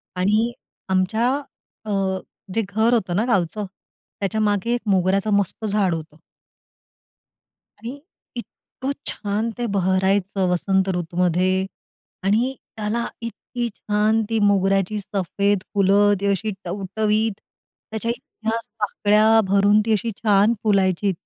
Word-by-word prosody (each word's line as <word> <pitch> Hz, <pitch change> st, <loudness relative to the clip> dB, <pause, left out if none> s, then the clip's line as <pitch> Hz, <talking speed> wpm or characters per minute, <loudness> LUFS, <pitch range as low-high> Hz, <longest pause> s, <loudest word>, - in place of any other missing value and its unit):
आणि 210 Hz, +6 st, +2 dB, 0.4 s
आमच्या 190 Hz, +6 st, +2 dB, 0.6 s
अ, 215 Hz, -, -4 dB, 0.6 s
जे 225 Hz, -, +1 dB
घर 220 Hz, +3 st, +2 dB
होतं 185 Hz, -7 st, +1 dB
ना 215 Hz, +5 st, +2 dB
गावचं, 210 Hz, -3 st, 0 dB, 0.5 s
त्याच्यामागे 210 Hz, +2 st, 0 dB
एक 240 Hz, -, -1 dB
मोगऱ्याचं 195 Hz, +2 st, +2 dB
मस्त 200 Hz, +2 st, 0 dB
झाड 200 Hz, -4 st, +1 dB
होतं. 155 Hz, -1 st, -8 dB, 1.6 s
आणि 245 Hz, +5 st, -7 dB, 0.4 s
इतकं 260 Hz, +2 st, -6 dB, 0.2 s
छान 210 Hz, +2 st, -1 dB
ते 240 Hz, -, -2 dB
भरायचं, 190 Hz, 0 st, +1 dB
वसंत 190 Hz, +2 st, +1 dB
ऋतूमध्ये 180 Hz, +2 st, +1 dB, 0.6 s
आणि 230 Hz, +7 st, +2 dB, 0.2 s
त्याला 220 Hz, +2 st, -1 dB
इतकी 235 Hz, +1 st, -4 dB
छान 215 Hz, +1 st, +1 dB
ती 225 Hz, -1 st, +1 dB
मोगऱ्याची 195 Hz, +1 st, +2 dB
सफेद 200 Hz, 0 st, 0 dB
फुलं, 200 Hz, +1 st, +4 dB
ती -, -, -1 dB
अशी 200 Hz, +2 st, 0 dB
टवटवीत, 210 Hz, +4 st, 0 dB, 0.6 s
त्याच्या 220 Hz, +1 st, -1 dB
इतक्या 225 Hz, -1 st, -4 dB, 0.2 s
पाकळ्या 215 Hz, +2 st, +3 dB
भरून, 200 Hz, +2 st, +4 dB
ती 225 Hz, -, +2 dB
अशी 225 Hz, +2 st, 0 dB
छान 210 Hz, +1 st, +4 dB
फुलायची. 195 Hz, -2 st, +2 dB
205 Hz, 115 wpm, -22 LUFS, 190-220 Hz, 1.6 s, फुलं